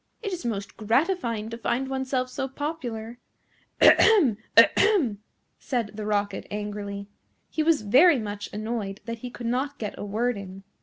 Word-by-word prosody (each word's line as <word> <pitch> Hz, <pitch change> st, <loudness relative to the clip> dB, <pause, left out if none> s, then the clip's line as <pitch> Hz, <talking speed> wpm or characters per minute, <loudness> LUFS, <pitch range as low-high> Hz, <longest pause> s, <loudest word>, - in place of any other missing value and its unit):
It 405 Hz, -3 st, -3 dB
is 355 Hz, -, -5 dB
most 205 Hz, -4 st, -4 dB
gratifying 230 Hz, -, 0 dB
to 230 Hz, -, -6 dB
find 250 Hz, +3 st, -1 dB
oneself 265 Hz, -1 st, -1 dB
so 270 Hz, +1 st, -3 dB
popular." 250 Hz, -5 st, -5 dB, 0.6 s
"Ahem! 315 Hz, -, +6 dB, 0.2 s
ahem!" 270 Hz, -, +5 dB, 0.4 s
said 235 Hz, -5 st, -2 dB
the 210 Hz, 0 st, -5 dB
Rocket 205 Hz, -1 st, -1 dB
angrily. 205 Hz, -1 st, -5 dB, 0.4 s
He 315 Hz, -, -1 dB
was 310 Hz, -6 st, +2 dB
very 275 Hz, -, +6 dB
much 205 Hz, -2 st, -5 dB
annoyed 215 Hz, -2 st, -4 dB
that 230 Hz, -1 st, -5 dB
he 250 Hz, -, -6 dB
could 240 Hz, 0 st, -9 dB
not 265 Hz, +4 st, -1 dB
get 210 Hz, -3 st, -4 dB
a -, -, -4 dB
word 225 Hz, +3 st, -1 dB
in. 195 Hz, 0 st, -10 dB
230 Hz, 155 wpm, -26 LUFS, 210-270 Hz, 0.6 s, Ahem